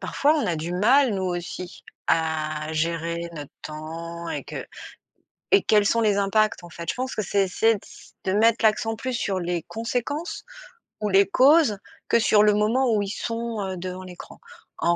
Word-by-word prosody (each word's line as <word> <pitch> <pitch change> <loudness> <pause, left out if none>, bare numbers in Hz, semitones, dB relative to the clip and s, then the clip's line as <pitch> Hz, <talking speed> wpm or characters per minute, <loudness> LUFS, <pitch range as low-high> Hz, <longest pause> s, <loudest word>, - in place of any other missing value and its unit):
parfois 295 +2 +2
on 300 - 0
a 170 - 0
du 165 +3 -4
mal 240 +6 +4
nous 190 - -2
aussi 175 0 -5 0.2
à 155 -1 0
gérer 170 +1 -2
notre 145 -3 -8
temps 165 +2 -7
et - - -4
que - - -6 0.9
et 400 0 +6
quels 210 -1 +3
sont 230 - +2
les 210 -2 +3
impacts, 200 -1 +1
en 175 - -10
fait. 170 0 -7
Je - - +1
pense 255 +1 -3
que 215 - -2
c'est 200 0 +1
essayer 220 +4 +2
de - - -7
s - - -16
de 190 - -1
mettre 225 +2 +3
l'accent 225 +1 +2
plus 255 +3 -4
sur 200 -5 -1
les 175 -2 -2
conséquences 245 +8 -3 0.6
ou 210 - 0
les 195 +1 +5
causes 270 +1 +5 0.3
que 235 - +3
sur 215 -2 +4
le 210 0 +5
moment 225 +5 +2
où 205 - +2
ils 200 - -3
sont, 230 0 -3
heu, 190 -1 -3
devant 185 +1 -6
l'écran. 180 -1 -11 0.4
En 170 0 +2
200 Hz, 195 wpm, -24 LUFS, 170-225 Hz, 0.9 s, et